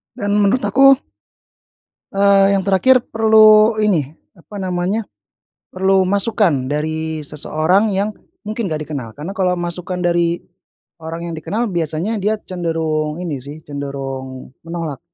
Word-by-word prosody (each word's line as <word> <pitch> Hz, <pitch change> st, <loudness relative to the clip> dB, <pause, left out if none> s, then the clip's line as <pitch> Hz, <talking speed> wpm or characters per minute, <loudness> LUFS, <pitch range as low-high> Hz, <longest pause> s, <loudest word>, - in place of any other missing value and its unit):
dan 205 Hz, -1 st, -3 dB
menurut 205 Hz, +6 st, +2 dB
aku 275 Hz, 0 st, +6 dB, 1.2 s
eee, 200 Hz, 0 st, +4 dB
yang 195 Hz, -, +1 dB
terakhir 215 Hz, +7 st, +4 dB
perlu 220 Hz, 0 st, +5 dB
ini 160 Hz, -8 st, +1 dB, 0.2 s
apa 205 Hz, +5 st, -12 dB
namanya, 185 Hz, +4 st, -1 dB, 0.7 s
perlu 190 Hz, 0 st, +2 dB
masukan 195 Hz, -, +1 dB
dari 155 Hz, +1 st, -3 dB
seseorang 160 Hz, +8 st, +1 dB
yang 200 Hz, +2 st, -1 dB, 0.3 s
mungkin 215 Hz, -1 st, -3 dB
nggak 155 Hz, -1 st, -3 dB
dikenal, 135 Hz, -7 st, -5 dB
karena 160 Hz, +6 st, -6 dB
kalau 180 Hz, -2 st, +1 dB
masukan 175 Hz, +1 st, -4 dB
dari 170 Hz, 0 st, +1 dB, 0.6 s
orang 165 Hz, +1 st, -6 dB
yang -, -, -5 dB
dikenal 220 Hz, +9 st, -2 dB
biasanya 170 Hz, +6 st, -2 dB
dia 215 Hz, +2 st, +1 dB
cenderung 160 Hz, -3 st, -2 dB
ini 155 Hz, -7 st, -4 dB
sih, 145 Hz, +3 st, -9 dB
cenderung 135 Hz, -2 st, -6 dB
menolak. 165 Hz, -5 st, -5 dB
175 Hz, 125 wpm, -18 LUFS, 155-205 Hz, 1.2 s, aku